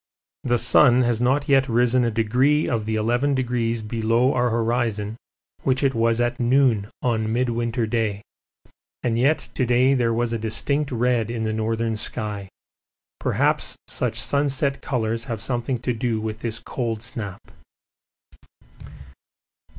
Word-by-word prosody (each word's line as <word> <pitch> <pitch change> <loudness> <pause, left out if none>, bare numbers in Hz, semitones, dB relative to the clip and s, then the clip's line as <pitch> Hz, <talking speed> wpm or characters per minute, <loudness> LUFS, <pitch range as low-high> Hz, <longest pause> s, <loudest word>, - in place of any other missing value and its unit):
The 120 -1 +2
sun 120 +2 +5
has 120 -1 0
not 130 +4 +1
yet 135 -1 +3
risen 120 +2 +3
a 120 - +1
degree 125 +7 +2
of 110 -3 -2
the 110 - -1
eleven 120 +6 +1
degrees 120 -3 -1
below 115 +4 +1
our 125 -1 +1
horizon 115 -2 -1 0.5
which 130 +1 0
it 135 -1 +2
was 115 0 +1
at 120 +1 0
noon 120 -4 +2
on 110 -3 0
Midwinter 120 -1 0
Day, 110 -3 -1 0.8
and 120 -2 0
yet 135 +7 +1
to 130 - 0
day 125 +2 +3
there 120 -3 +1
was 120 0 0
a 115 - -2
distinct 135 +7 -1
red 120 -2 +1
in 115 -1 -3
the 110 0 -1
northern 110 +1 -1
sky. 105 -3 -2 0.7
Perhaps - - 0
such - - -1
sunset 140 -1 0
colours 115 -3 -2
have 115 -5 -4
something 120 +2 -2
to 125 +1 -2
do 115 -1 -1
with 110 0 -4
this 115 -1 -3
cold 115 -3 -4
snap. 110 -5 -6
120 Hz, 145 wpm, -23 LUFS, 110-125 Hz, 0.8 s, sun